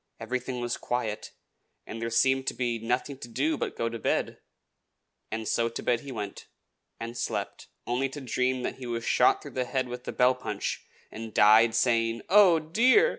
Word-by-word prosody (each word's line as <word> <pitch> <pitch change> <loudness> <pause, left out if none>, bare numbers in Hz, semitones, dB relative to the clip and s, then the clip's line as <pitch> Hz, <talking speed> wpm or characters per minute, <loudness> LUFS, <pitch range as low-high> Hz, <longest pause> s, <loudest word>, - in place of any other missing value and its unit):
Everything 125 0 -3
was 120 0 -2
quiet, 110 -3 -3 0.6
and 115 - -7
there 115 - -2
seemed 130 +3 +2
to - - -1
be 120 -2 -1
nothing 125 +4 -2
to 120 - -8
do 135 +7 0
but - - -4
go 115 - -1
to 115 0 -5
bed; - - -1 0.9
and 110 -1 -4
so 115 0 +1
to 115 - -6
bed 120 -1 +2
he 140 +1 -9
went, 105 -5 -6 0.5
and 115 +1 -6
slept, 115 - -4 0.2
only 125 +3 0
to 145 - -7
dream 125 0 -1
that - - -3
he 125 - -6
was 115 -1 -3
shot - - +3
through - - -9
the 130 -1 -2
head 130 0 -1
with 125 0 -8
a - - -1
bell 125 +1 +4
punch, 125 -5 -4 0.2
and 110 0 -8
died 110 +2 +6
saying, 115 -1 +1
"Oh, 190 -3 +7
dear!" 235 - +4
120 Hz, 190 wpm, -28 LUFS, 115-130 Hz, 0.9 s, Oh